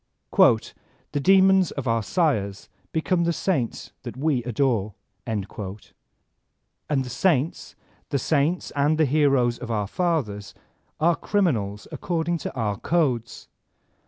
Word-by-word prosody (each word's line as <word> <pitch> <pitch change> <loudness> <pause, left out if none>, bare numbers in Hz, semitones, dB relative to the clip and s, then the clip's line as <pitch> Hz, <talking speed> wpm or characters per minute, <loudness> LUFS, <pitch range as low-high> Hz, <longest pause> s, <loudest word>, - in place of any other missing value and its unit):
*'The 145 - +1
demons 190 +1 +5
of 140 -2 -5
our 115 0 +2
sires 105 - -1 0.2
become 170 +2 +1
the 170 - +2
saints 160 - -2
that - - -8
we 140 -2 +1
adore," 115 -5 0
— 100 +2 -33
and 105 -4 -2
the 105 +7 -8
saints, 155 +2 0 0.3
the 140 - 0
saints 155 +5 0
and 145 +2 +2
the 155 - +4
heroes 135 -4 +2
of 125 - -7
our 105 -3 0
fathers, 125 - -2 0.4
are 170 +2 +3
criminals 110 - -1
according 170 -1 -2
to - - -4
our 105 -5 -2
codes. 130 -9 -1
140 Hz, 125 wpm, -24 LUFS, 110-165 Hz, 0.4 s, demons